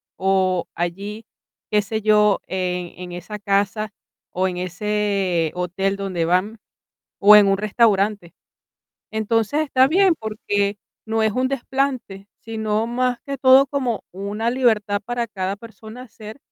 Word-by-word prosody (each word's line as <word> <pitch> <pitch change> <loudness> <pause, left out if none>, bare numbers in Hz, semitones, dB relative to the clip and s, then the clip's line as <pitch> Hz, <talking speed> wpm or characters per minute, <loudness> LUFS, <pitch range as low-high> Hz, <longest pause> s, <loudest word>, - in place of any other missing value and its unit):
o 185 -2 +1
allí, 200 +6 -4 0.4
qué 210 -1 +3
sé 220 +2 -4
yo, 210 -1 +4
en 180 -2 -3
en 180 -1 -8
esa 195 +4 -7
casa, 205 +2 0 0.4
o 185 +1 0
en 180 - -4
ese 185 -2 -1
hotel 185 +2 -2
donde 185 -4 -2
van, 185 +6 0 0.6
o 210 +1 +8
en 205 -1 +6
un 195 0 +2
restaurante. 210 -3 +1 0.8
Entonces, 225 +6 0
está 270 -3 +3
bien, 375 +2 +4
porque 205 -2 -2 0.3
no 220 0 0
es 220 -1 +2
un 255 +2 0
desplante, 260 -7 -3
sino, 220 0 -2
más 250 +1 0
que 275 0 -3
todo, 265 +1 +6
como 260 -5 -2
una 205 +4 -3
libertad 220 -5 +1
para 240 0 -2
cada 195 -2 -3
persona 225 +1 -12
hacer, 220 +1 -11
210 Hz, 140 wpm, -21 LUFS, 195-230 Hz, 0.8 s, o